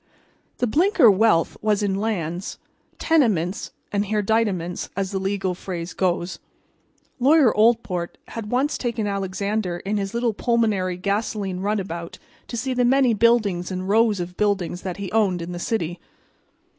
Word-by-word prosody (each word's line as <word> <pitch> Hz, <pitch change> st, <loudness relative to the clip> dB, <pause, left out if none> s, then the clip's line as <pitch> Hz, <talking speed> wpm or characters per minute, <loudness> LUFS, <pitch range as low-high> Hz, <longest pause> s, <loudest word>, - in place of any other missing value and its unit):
The -, -, +1 dB
Blinker 310 Hz, -, +5 dB
wealth 195 Hz, -4 st, +3 dB
was 210 Hz, -1 st, +1 dB
in 200 Hz, -1 st, +1 dB
lands, 190 Hz, -4 st, -3 dB, 0.4 s
tenements 210 Hz, -, +1 dB, 0.2 s
and 205 Hz, 0 st, 0 dB
hereditaments, 205 Hz, -4 st, 0 dB
as 195 Hz, -1 st, -1 dB
the 195 Hz, -, -1 dB
legal 190 Hz, -1 st, -1 dB
phrase 175 Hz, -2 st, -6 dB
goes. 175 Hz, -1 st, -1 dB, 0.8 s
Lawyer 275 Hz, -1 st, +5 dB
Oldport 210 Hz, -6 st, +1 dB
had 220 Hz, -2 st, -6 dB
once 265 Hz, +5 st, 0 dB
taken 235 Hz, -3 st, -2 dB
Alexander 200 Hz, -1 st, -2 dB
in 200 Hz, +4 st, -2 dB
his 200 Hz, +2 st, -3 dB
little 235 Hz, -1 st, +1 dB
pulmonary 210 Hz, -6 st, 0 dB
gasoline 200 Hz, -1 st, -2 dB
runabout 190 Hz, -4 st, -3 dB, 0.3 s
to 235 Hz, -, -5 dB
see 260 Hz, +3 st, -1 dB
the 250 Hz, 0 st, +1 dB
many 255 Hz, -1 st, +4 dB
buildings 210 Hz, -5 st, +2 dB
and 185 Hz, 0 st, -4 dB
rows 215 Hz, 0 st, +3 dB
of 175 Hz, 0 st, -5 dB
buildings 195 Hz, -4 st, 0 dB
that 185 Hz, -1 st, -5 dB
he 200 Hz, -2 st, -5 dB
owned 205 Hz, -5 st, +2 dB
in 170 Hz, +1 st, -6 dB
the 175 Hz, -, -5 dB
city. 175 Hz, -5 st, -2 dB
200 Hz, 145 wpm, -23 LUFS, 180-225 Hz, 0.8 s, Blinker